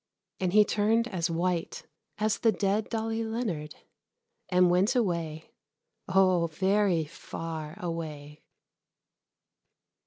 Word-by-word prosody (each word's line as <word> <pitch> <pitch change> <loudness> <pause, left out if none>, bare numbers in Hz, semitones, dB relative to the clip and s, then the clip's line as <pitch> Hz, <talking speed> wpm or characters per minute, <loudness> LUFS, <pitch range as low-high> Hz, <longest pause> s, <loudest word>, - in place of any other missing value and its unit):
And 185 -2 0
he 210 0 +7
turned 220 +3 +2
as 180 -3 -1
white 170 0 -2 0.3
as 215 +1 0
the 225 - +4
dead 200 +2 0
Dolly 225 0 -2
Leonard, 215 -10 -3 0.7
and 180 -1 +4
went 195 +8 +3
away 170 -9 -1 0.6
oh, 185 -3 +3
very 190 0 +1
far 160 0 -7
away. 155 -4 -6
180 Hz, 100 wpm, -28 LUFS, 165-210 Hz, 0.7 s, he